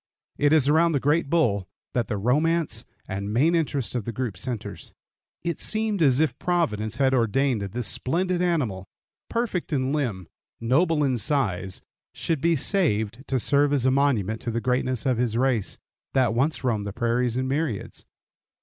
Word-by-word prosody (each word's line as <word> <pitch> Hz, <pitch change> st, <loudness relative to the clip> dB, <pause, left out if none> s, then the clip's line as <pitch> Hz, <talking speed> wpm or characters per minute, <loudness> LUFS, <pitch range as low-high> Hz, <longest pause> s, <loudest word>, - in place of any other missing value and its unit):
It 145 Hz, 0 st, +3 dB
is 155 Hz, -4 st, +4 dB
around 165 Hz, +3 st, +4 dB
the 140 Hz, -, +2 dB
great 145 Hz, +2 st, +1 dB
bull 105 Hz, -, +1 dB, 0.3 s
that 120 Hz, -2 st, 0 dB
the 105 Hz, -, -2 dB
romance 140 Hz, +2 st, +1 dB, 0.2 s
and 100 Hz, +2 st, -4 dB
main 145 Hz, +10 st, +3 dB
interest 145 Hz, -6 st, -1 dB
of 120 Hz, -3 st, -2 dB
the 115 Hz, -, -4 dB
group 115 Hz, -3 st, -3 dB
centers. 120 Hz, +4 st, -5 dB, 0.5 s
It 170 Hz, -2 st, -2 dB
seemed 215 Hz, -3 st, 0 dB
as 135 Hz, -4 st, +4 dB
if 155 Hz, -4 st, +1 dB
Providence 150 Hz, -13 st, 0 dB
had 135 Hz, -1 st, +3 dB
ordained 125 Hz, 0 st, +1 dB
that 100 Hz, -1 st, -5 dB
this 120 Hz, -1 st, -2 dB
splendid 180 Hz, -, 0 dB
animal, 125 Hz, -, -1 dB, 0.4 s
perfect 230 Hz, -8 st, -2 dB
in 135 Hz, -1 st, 0 dB
limb, 115 Hz, -, -2 dB, 0.3 s
noble 150 Hz, +6 st, +2 dB
in 130 Hz, -4 st, +1 dB
size, 95 Hz, -7 st, -1 dB, 0.3 s
should 160 Hz, -5 st, -1 dB
be 170 Hz, 0 st, +3 dB
saved 130 Hz, -, +1 dB
to 135 Hz, -, 0 dB
serve 145 Hz, +3 st, +2 dB
as 140 Hz, -3 st, +1 dB
a 130 Hz, -, +4 dB
monument 120 Hz, -6 st, +1 dB
to 120 Hz, -, -4 dB
the 115 Hz, 0 st, -1 dB
greatness 125 Hz, 0 st, 0 dB
of 130 Hz, -3 st, +1 dB
his 120 Hz, -2 st, 0 dB
race, 125 Hz, -5 st, +1 dB, 0.4 s
that 125 Hz, -4 st, +3 dB
once 135 Hz, +5 st, 0 dB
roamed 110 Hz, -5 st, 0 dB
the 100 Hz, -, -5 dB
prairies 120 Hz, +1 st, 0 dB
in 130 Hz, 0 st, -1 dB
myriads. 135 Hz, -6 st, -3 dB
130 Hz, 175 wpm, -25 LUFS, 115-155 Hz, 0.5 s, is